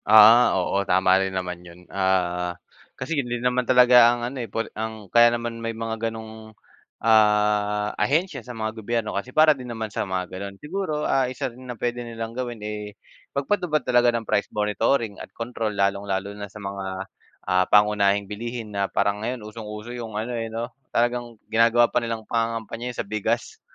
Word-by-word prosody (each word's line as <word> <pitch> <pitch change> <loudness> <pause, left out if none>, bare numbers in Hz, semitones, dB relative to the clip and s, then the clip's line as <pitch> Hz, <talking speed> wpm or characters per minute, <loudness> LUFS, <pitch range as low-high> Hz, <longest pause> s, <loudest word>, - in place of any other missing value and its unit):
Ah, 110 +1 +8
oo 95 +2 +1
tama 95 0 +3
rin 95 - 0
naman 90 -2 -4
yun 90 0 -14
ah, 90 -2 0 0.4
kasi 130 +6 -4
yun 120 - -8
din 120 +1 -3
naman 125 0 +1
talaga 125 -2 +7
ang 120 0 -1
ano 130 +3 -5
eh, 115 - -6
por 115 - -2
ang 110 -3 -6
kaya 120 0 +8
naman 115 -1 -3
may 115 -1 -4
mga 115 0 -2
ganong, 110 -1 -10 0.5
ah, 105 -1 +3
ahensya 155 -1 +1
sa 120 +1 -9
mga 110 0 -2
gobyerno 115 0 -2
kasi 100 +5 -3
para 155 +3 +5
din 130 -3 -9
naman 110 -3 -5
sa - - -1
mga 95 -1 -1
ganon 100 +1 -6
siguro 155 - -3
ah, 130 -2 +2
isa 125 -1 -4
rin 130 +1 -13
na 120 - -5
pwede 120 +2 -2
nilang 115 -1 -6
gawin 120 -3 -5
eh, 105 -1 -6 0.4
mag-patupad 155 0 0
talaga 120 -1 +4
ng 115 - -6
price 100 - 0
monitoring 105 +1 0
at - - -9
control 115 -3 -3
lalong-lalo 100 0 0
na 100 0 -7
sa 105 - -12
mga, 95 -1 -5 0.4
ah, 90 0 +3
pangunahing 100 -1 +4
bilihin 110 +1 -6
na 100 -1 -1
parang 100 +1 0
ngayon 120 0 -4
usong-uso 105 +1 -8
yung 115 -3 -6
ano 115 +3 -3
eh, 115 -1 -3
no, 115 +1 -5 0.2
talagang 120 -1 -1
ginagawa 115 +1 +4
pa 125 - +3
nilang 115 -1 -4
pangangampanya 115 +1 -2
yun 120 - -8
sa - - -2
bigas, 110 +3 -2
110 Hz, 185 wpm, -24 LUFS, 100-120 Hz, 0.5 s, Ah